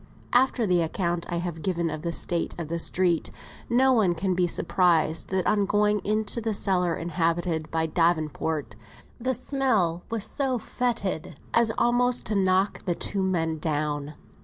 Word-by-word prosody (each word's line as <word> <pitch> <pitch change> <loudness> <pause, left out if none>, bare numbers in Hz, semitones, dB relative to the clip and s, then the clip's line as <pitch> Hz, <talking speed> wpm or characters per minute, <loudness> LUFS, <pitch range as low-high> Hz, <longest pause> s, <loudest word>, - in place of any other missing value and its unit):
After 245 -1 +3
the 180 -3 +3
account 170 +1 -2
I - - -1
have 170 -2 -4
given 170 -3 -1
of 155 -1 -5
the 170 - -2
state 170 0 -2
of 165 -3 -5
the 170 0 -2
street, 175 -1 +1 0.4
no 260 +2 +4
one 200 -8 +3
can 185 +3 0
be 180 0 +2
surprised 165 -2 +1
that 190 -1 -1
on 205 -2 +2
going 210 0 +2
into 215 +3 -1
the 220 -1 -1
cellar 180 -4 +1
inhabited 165 -1 -1
by 160 0 0
Davenport, 160 -5 0 0.4
the 255 +2 0
smell 230 -11 0
was 225 -3 0
so 265 -3 0
foetid 220 - -2 0.2
as 235 -1 +4
almost 245 +1 +2
to 215 - -1
knock 190 0 +1
the 175 -3 0
two 200 +3 -2
men 165 -4 0
down. 150 -1 -2
180 Hz, 160 wpm, -26 LUFS, 165-215 Hz, 0.4 s, no